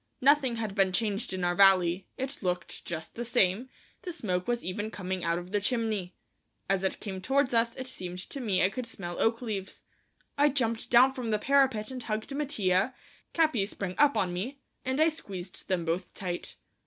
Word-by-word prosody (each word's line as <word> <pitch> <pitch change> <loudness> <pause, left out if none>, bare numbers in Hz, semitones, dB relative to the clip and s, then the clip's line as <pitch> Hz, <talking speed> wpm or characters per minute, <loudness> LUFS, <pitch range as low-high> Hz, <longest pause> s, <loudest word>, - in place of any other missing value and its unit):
Nothing 270 -2 +4
had 220 -3 -3
been 195 -2 +3
changed 210 +1 -1
in 185 -1 -3
our 175 0 +2
valley; 185 -1 +5
it 265 +2 -4
looked 180 -2 -3
just 165 -2 -5
the 240 - -4
same; 235 0 +2 0.3
the 365 - -5
smoke 185 - -2
was 240 0 -1
even 210 +4 -3
coming 185 -3 -4
out 170 0 +1
of 175 +1 -7
the 205 0 +1
chimney. 215 -5 -1 0.5
As 195 0 +1
it 190 - -1
came 190 -3 -5
towards 270 +3 +2
us 230 0 +2
it 260 - -5
seemed 180 -7 -4
to 280 - -3
me 205 -7 +1
I 190 - +3
could 245 +3 -4
smell 175 -6 -5
oak 230 +2 +2
leaves. 200 -4 -5 0.6
I 295 +1 +6
jumped 230 -5 0
down 255 +2 +6
from 250 -3 -4
the 215 - +2
parapet 265 -3 +2
and 255 -1 -5
hugged 220 +3 -3
Mattia, 240 -6 +1 0.4
Capi 310 -12 +3
sprang 195 -3 -4
up 290 -1 +5
on 180 -2 +1
me, 245 +11 -4 0.2
and 260 +2 -1
I 315 +1 +6
squeezed 190 - -8
them 180 -3 0
both 170 +2 -2
tight. 180 -2 -4
215 Hz, 195 wpm, -29 LUFS, 185-255 Hz, 0.6 s, I